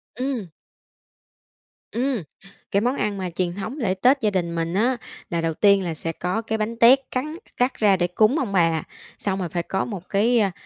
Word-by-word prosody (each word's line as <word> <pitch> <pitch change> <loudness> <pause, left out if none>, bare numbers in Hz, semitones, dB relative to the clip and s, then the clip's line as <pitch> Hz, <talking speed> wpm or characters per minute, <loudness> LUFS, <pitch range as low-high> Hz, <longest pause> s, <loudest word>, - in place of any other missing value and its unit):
Ừm. 250 -7 -3 1.4
Ừm, 245 -5 -1 0.5
cái 200 - +2
món 250 +4 +1
ăn 210 -5 -1
mà 185 -1 -3
truyền 175 0 -2
thống 220 +7 -5
lễ 215 -10 0
Tết 255 +8 +3
gia 215 - +3
đình 175 -4 -1
mình 165 0 -2
á, 240 +6 +2 0.3
là 170 -1 -1
đầu 165 -1 0
tiên 200 +1 +4
là 170 - -2
sẽ 165 +1 -4
có 180 +7 -2
cái 220 0 -2
bánh 220 +2 -2
tét 250 +4 +7
cắn 300 +5 -2 0.2
cắt 250 +1 +2
ra 205 -3 +3
để 175 -1 +1
cúng 215 - +3
ông 235 -7 -2
bà, 165 -3 +2 0.4
xong 195 -1 -1
rồi 180 -3 -2
phải 175 -1 -2
có 190 - -1
một 190 -6 -7
cái, 230 +4 +3
a, 200 -3 +2
200 Hz, 210 wpm, -23 LUFS, 180-240 Hz, 1.4 s, tét